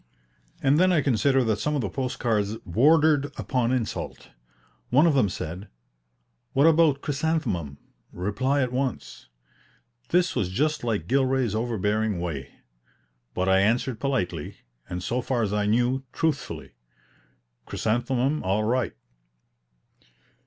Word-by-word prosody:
And 140 +3 +4
then 185 +1 +4
I 160 -5 +3
consider 135 +1 +2
that 110 -3 0
some 150 +5 -1
of 140 - 0
the 105 - -2
post 125 +7 -3
cards 110 -2 0
bordered 145 - +4
upon 125 -2 0
insult. 125 -4 -3 0.6
One 145 +6 +5
of 165 - +4
them 130 -8 +3
said, 90 +3 -6 0.9
"What 140 +3 +4
about 160 -3 +4
chrysanthemum? 135 - -2 0.3
reply 130 +10 0
at 125 - -2
once." 130 0 -4 0.8
This 180 +1 +2
was 90 - 0
just 150 +10 0
like 105 -8 -1
Gilray's 130 -3 +1
overbearing 110 -3 -1
way; 80 -6 -4 0.8
but 90 +1 0
I 95 0 +4
answered 115 +3 +1
politely, 90 - -2 0.3
and 90 0 -4
so 125 +6 -1
far 125 -2 -1
as 105 -1 -1
I 105 0 0
knew, 120 +4 +2
truthfully, 160 -5 -2 1.0
"Chrysanthemum 125 +6 0
all 95 +3 0
right." 120 +2 0
125 Hz, 130 wpm, -25 LUFS, 105-140 Hz, 1.0 s, One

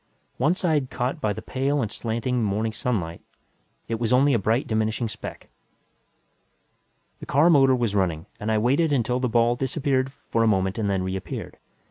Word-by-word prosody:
One 150 +8 +2
side 155 -8 0
caught 125 +1 -3
by 105 - +1
the 100 - -6
pale 140 +2 -1
and 110 -6 -2
slanting 120 +1 -2
morning 110 +2 -1
sunlight, 105 -8 -2 0.7
it 115 -1 -2
was 115 -2 -1
only 135 +3 +4
a 115 - +3
bright 110 +6 +1
diminishing 110 +1 -1
speck. 110 - -8 1.7
The - - -10
car 155 +6 +4
motor 135 -4 +5
was 120 -5 -1
running 90 -5 0
and 110 +1 -2
I 110 - +2
waited 140 +8 +2
until 125 -2 +1
the 125 -1 0
ball 120 +1 +3
disappeared 135 0 0 0.2
for 115 - +2
a 115 - +4
moment 95 0 +1
and 105 -2 0
then 95 -2 0
reappeared. 95 0 -5
120 Hz, 175 wpm, -24 LUFS, 110-130 Hz, 1.7 s, motor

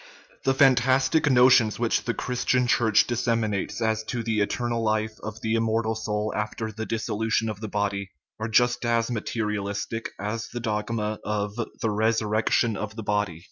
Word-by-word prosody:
The 135 0 +3
fantastic 135 +3 +4
notions 125 -4 +5
which 120 -1 0
the 120 - -1
Christian 125 0 0
Church 110 -3 +3
disseminates 115 -4 -1
as 110 -1 0
to 120 0 -3
the 110 -1 0
eternal 120 +2 -1
life 110 0 -1
of 110 +1 -7
the 110 0 -1
immortal 115 0 +1
soul 110 -1 -2
after 110 +1 -3
the 110 +1 -6
dissolution 110 0 -1
of 105 -2 -5
the 110 - -4
body 100 -1 -2 0.3
are 110 - -2
just 120 +2 +2
as 115 0 +1
material 105 -2 -2
istic 105 +3 -3
as 105 +3 -3
the 120 - -6
dogma 110 -1 -2
of 105 -1 -2 0.3
"the 110 - +1
resurrection 110 +1 +1
of 105 +1 -5
the 110 - -6
body." 105 -5 -1
110 Hz, 165 wpm, -25 LUFS, 105-120 Hz, 0.3 s, notions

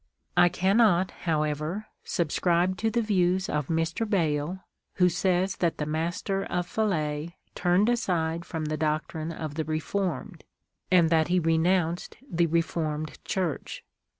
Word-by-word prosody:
I 175 - +6
cannot, 190 0 +3 0.2
however, 155 +5 -1 0.2
subscribe 175 +1 +1
to 225 +4 +1
the 235 +1 0
views 190 -2 +2
of 150 -2 -1
Mr. 165 +7 -1
Bayle, 165 -1 0 0.3
who 180 -2 +4
says 185 +2 +1
that 170 -2 0
the 150 - -2
Master 175 +5 -1
of 175 0 -1
Falais 170 -5 -1 0.2
turned 180 +4 +2
aside 170 -8 0
from 160 -2 -4
the 155 0 -2
doctrine 155 +1 -2
of 155 -2 -5
the 160 +1 -2
Re 155 +1 -1
formed, 195 +3 -3 0.5
and 175 -3 +4
that 160 -1 +4
he 180 +1 +2
renounced 165 +1 +1
the 170 -6 +1
Reformed 155 -2 -2
Church. 180 -6 -3
170 Hz, 140 wpm, -27 LUFS, 155-185 Hz, 0.5 s, I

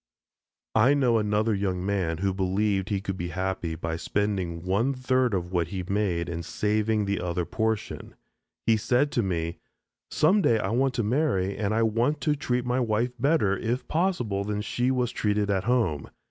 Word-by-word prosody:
I 125 +6 +5
know 125 -5 +3
another 105 +1 +1
young 95 -2 -1
man 95 -5 0
who 95 +2 0
believed 95 +1 0
he 100 -2 -1
could 95 -1 -4
be 85 - -3
happy 90 -1 -3
by 80 0 -3
spending 95 -3 -2
one 115 +9 +1
third 130 -3 +1
of 90 -1 -3
what 85 -3 0
he 95 +1 -4
made 90 -3 -1
and 85 -1 -4
saving 105 +3 0
the 100 0 -1
other 90 0 -2
portion. 110 +1 -3 0.5
He 115 -1 +4
said 125 +6 +1
to 120 - +1
me, 85 -4 -2 0.5
"some 190 +7 +3
day 115 -10 +3
I 95 -3 -2
want 130 +2 +1
to 120 - 0
marry 105 -6 +1
and 105 -1 -1
I 115 +1 +2
want 115 +7 +1
to 150 +3 +1
treat 125 -3 -1
my 125 +1 +1
wife 120 0 0
better, 135 -8 +2
if 120 +6 -2
possible, 155 - 0
than 105 0 -2
she 120 +3 0
was 125 -2 0
treated 105 -1 0
at 95 -1 0
home. 110 - 0
105 Hz, 185 wpm, -26 LUFS, 95-120 Hz, 0.5 s, I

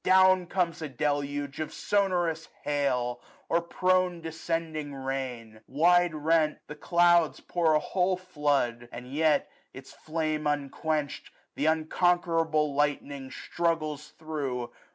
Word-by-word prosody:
Down 185 -1 +5
comes 175 -2 -1
a 155 - -4
deluge 145 +1 -2
of 155 - -3
sonorous 175 -5 0
hail, 125 -4 0 0.3
Or 170 - +2
prone 185 0 +1
descending 160 -2 -4
rain. 130 -5 -5
Wide 175 +4 +3
rent, 155 0 +2
the - - -8
clouds, 170 +1 +3
1145 - - -25
Pour 170 -3 +3
a - - +4
whole 185 +3 0
flood; 145 -9 -1
and 125 +2 -9
yet, 155 0 +2 0.3
its 135 0 -11
flame 155 -1 -2
unquench'd, 145 +1 -2 0.3
Th* 150 - 0
unconquerable 160 -1 +1
lightning 140 -1 -1
struggles 155 -1 -2
through. 135 -7 -4
155 Hz, 120 wpm, -28 LUFS, 140-170 Hz, 0.3 s, Down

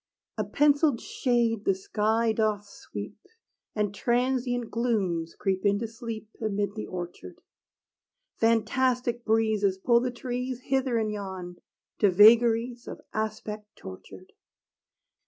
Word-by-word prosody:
A - - +2
penciled 285 +4 +3
shade 235 -5 0
the 195 - +2
sky 220 +4 0
doth 215 -2 0
sweep, 105 - -9 0.5
And 210 -2 0
transient 245 +1 0
glooms 190 -9 -1
creep 190 -2 -1
in 200 -1 +3
to 230 +2 -3
sleep 225 -1 -7
Amid 205 -2 -1
the 215 - -6
orchard; 175 - -7 1.0
Fantastic 240 +1 +1
breezes 220 -4 +2
pull 235 +5 +3
the 250 +1 -1
trees 250 0 -4
Hither 260 -2 0
and 215 -1 0
yon, 190 -4 -6 0.4
to 205 - +5
vagaries 230 +4 +5
Of - - -7
aspect 215 -1 -4
tortured. 95 0 -12
220 Hz, 120 wpm, -27 LUFS, 205-240 Hz, 1.0 s, to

